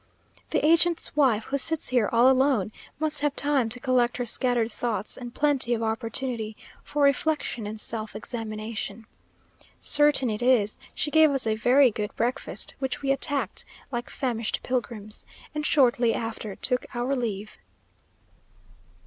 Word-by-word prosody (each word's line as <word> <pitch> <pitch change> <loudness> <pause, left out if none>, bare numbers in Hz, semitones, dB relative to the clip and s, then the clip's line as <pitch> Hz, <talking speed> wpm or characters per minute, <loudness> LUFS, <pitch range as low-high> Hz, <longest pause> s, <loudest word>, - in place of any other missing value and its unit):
The - - 0
agent's 335 +1 +3
wife, 255 -7 +3
who 280 +5 -2
sits 320 +2 +1
here 245 -4 +2
all 235 +2 +5
alone, 260 -6 +3 0.3
must 310 -1 0
have 290 -1 0
time 285 -5 +1
to 250 +2 0
collect 245 -2 +1
her 245 - -2
scattered 235 -1 0
thoughts, 215 -3 -2
and 245 -2 -8
plenty 275 -5 +3
of 230 - -3
opportunity 225 0 -3 0.3
for 295 -1 -1
reflection 280 -5 +1
and 215 +1 -6
self 220 -1 -3
examination. 220 -1 -5 0.7
Certain 295 -3 +3
it 210 +2 -4
is, 240 -4 +2 0.2
she 300 - -1
gave 315 0 +6
us 270 -3 0
a 220 - +1
very 250 +4 +4
good 210 0 -4
breakfast, 245 +3 -2
which 265 +1 -3
we 275 - +1
attacked 275 -5 0 0.3
like 240 -1 -4
famished 235 -4 -2
pilgrims; 230 -4 -4 0.3
and 300 0 -2
shortly 245 -5 +3
after 225 -3 -5
took 250 -1 0
our 245 +3 0
leave. 215 -4 -4
245 Hz, 150 wpm, -26 LUFS, 225-275 Hz, 0.7 s, gave